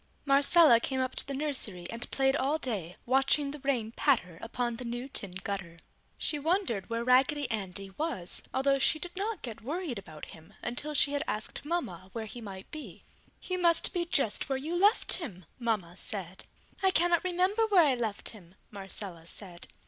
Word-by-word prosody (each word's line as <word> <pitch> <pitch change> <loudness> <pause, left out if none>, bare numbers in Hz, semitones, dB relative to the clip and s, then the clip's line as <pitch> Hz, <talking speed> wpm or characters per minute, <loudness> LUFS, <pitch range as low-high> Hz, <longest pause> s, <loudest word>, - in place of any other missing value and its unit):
Marcella 280 -1 +6
came 265 +2 -2
up 260 0 0
to - - -3
the 280 - -3
nursery 260 -11 0
and 230 +1 -4
played 270 0 +2
all 285 +3 +1
day, 200 - -3
watching 270 +3 +2
the 295 - -7
rain 255 -5 0
patter 200 - +1
upon 240 0 -2
the 250 - -5
new 240 +2 -4
tin 215 -7 -5
gutter. 185 -4 -4 0.4
She 300 - -1
wondered 305 - 0
where 230 0 -1
Raggedy 260 +3 +4
Andy 195 -2 -3
was, 275 - -1
although 275 +1 +2
she 310 - +3
did 350 +3 -7
not 415 +3 -3
get 230 -4 -6
worried 295 - -3
about 155 -5 -10
him 165 +6 -15
until 295 +5 -3
she 285 - +5
had 285 +1 0
asked 215 +6 -4
Mama 190 - -3
where 225 -2 -4
he 235 +3 -8
might 195 -3 -9
be. 310 -1 -8 0.4
"He 365 - -3
must 340 -2 +4
be 350 -2 0
just 275 -6 +1
where 270 - +1
you 310 +6 -3
left 405 +6 +4
him!" 195 - -7
Mama 210 -8 -1
said. 190 -2 -5 0.4
"I 385 - +5
cannot 345 -2 +3
remember 370 +5 +2
where 375 -6 +6
I 280 - +4
left 225 -4 -2
him!" 185 -5 -12 0.2
Marcella 195 -4 -5
said. 175 -2 -8
255 Hz, 185 wpm, -30 LUFS, 200-305 Hz, 0.4 s, Marcella